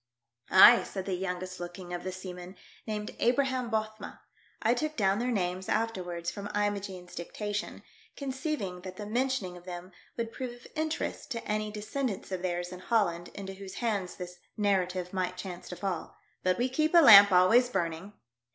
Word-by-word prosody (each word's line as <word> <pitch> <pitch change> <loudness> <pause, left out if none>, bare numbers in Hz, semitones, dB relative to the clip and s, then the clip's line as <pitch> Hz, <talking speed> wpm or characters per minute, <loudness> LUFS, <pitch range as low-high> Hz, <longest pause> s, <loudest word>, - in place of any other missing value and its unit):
Ay," 230 +5 +9
said 190 -2 -5
the 195 - -2
youngest 185 0 -4
looking 175 0 -7
of 175 - -4
the 185 - -3
seamen, 180 0 -8 0.3
named 210 -1 -4
Abraham 255 0 +1
Bothma 215 -1 -3 0.2
— - - -33
I 230 +1 +4
took 310 +5 -2
down 195 -1 +2
their 245 +1 0
names 185 -4 -1
afterwards 180 -6 -1
from 200 0 -6
Imogene's 200 -3 -2
dictation, 205 +4 -4 0.3
conceiving 265 - -3
that 185 0 -8
the 210 - -5
mentioning 240 -4 -1
of 175 - -15
them 180 0 -7 0.3
would 230 -1 -2
prove 255 -1 -5
of 240 +1 -14
interest 315 0 -2
to 230 - -6
any 215 0 -1
de 210 0 -6
scendants 230 -3 -3
of 185 -2 -2
theirs 175 -1 -2
in 180 - -8
Holland 180 -5 +1
into 195 -1 -6
whose 190 0 -9
hands 205 -6 -1
this 180 -1 -8 0.2
narrative 185 -3 0
might 185 -1 -1
chance 180 -1 -7
to 180 - -5
fall 180 -2 -4
— - - -41
"but 185 0 +2
we 245 - +1
keep 310 +6 +1
a 340 - +10
lamp 205 -7 +10
always 220 +8 +5
burning." 175 -1 -3
195 Hz, 180 wpm, -30 LUFS, 180-230 Hz, 0.3 s, a